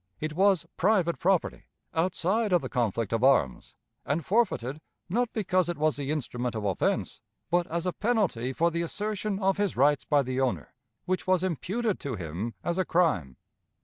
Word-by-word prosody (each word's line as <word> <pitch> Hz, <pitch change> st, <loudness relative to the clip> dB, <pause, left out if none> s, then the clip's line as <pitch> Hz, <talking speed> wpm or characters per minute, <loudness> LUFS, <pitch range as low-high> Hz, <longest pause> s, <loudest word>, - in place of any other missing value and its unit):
It 155 Hz, 0 st, -3 dB
was 190 Hz, 0 st, +3 dB
private 185 Hz, -3 st, +2 dB
property, 185 Hz, -1 st, +1 dB, 0.3 s
outside 185 Hz, +5 st, 0 dB
of 175 Hz, -, +3 dB
the -, -, -4 dB
conflict 115 Hz, -3 st, -1 dB
of 115 Hz, +1 st, 0 dB
arms, 80 Hz, -, +2 dB, 0.3 s
and 145 Hz, +2 st, -2 dB
forfeited, 155 Hz, -, 0 dB, 0.3 s
not 230 Hz, +6 st, 0 dB
because 185 Hz, -5 st, +1 dB
it 175 Hz, -, -2 dB
was 155 Hz, 0 st, +1 dB
the 140 Hz, -1 st, -4 dB
instrument 125 Hz, -5 st, -2 dB
of 110 Hz, -1 st, -3 dB
offense, 95 Hz, -3 st, -1 dB, 0.3 s
but 175 Hz, 0 st, +2 dB
as 170 Hz, +1 st, -2 dB
a 180 Hz, -, 0 dB
penalty 200 Hz, -, 0 dB
for 170 Hz, +5 st, +1 dB
the 170 Hz, +1 st, -1 dB
assertion 205 Hz, +3 st, -2 dB
of 195 Hz, -1 st, +1 dB
his 205 Hz, -7 st, -1 dB
rights 145 Hz, +2 st, +3 dB
by 145 Hz, -2 st, +2 dB
the 130 Hz, +1 st, -2 dB
owner, 130 Hz, -2 st, -2 dB, 0.3 s
which 185 Hz, 0 st, -2 dB
was 185 Hz, -1 st, +3 dB
imputed 195 Hz, -, -1 dB
to 135 Hz, -4 st, -4 dB
him 90 Hz, +5 st, -5 dB
as 175 Hz, +2 st, -1 dB
a -, -, +3 dB
crime. 150 Hz, -, +1 dB
170 Hz, 180 wpm, -28 LUFS, 130-190 Hz, 0.3 s, was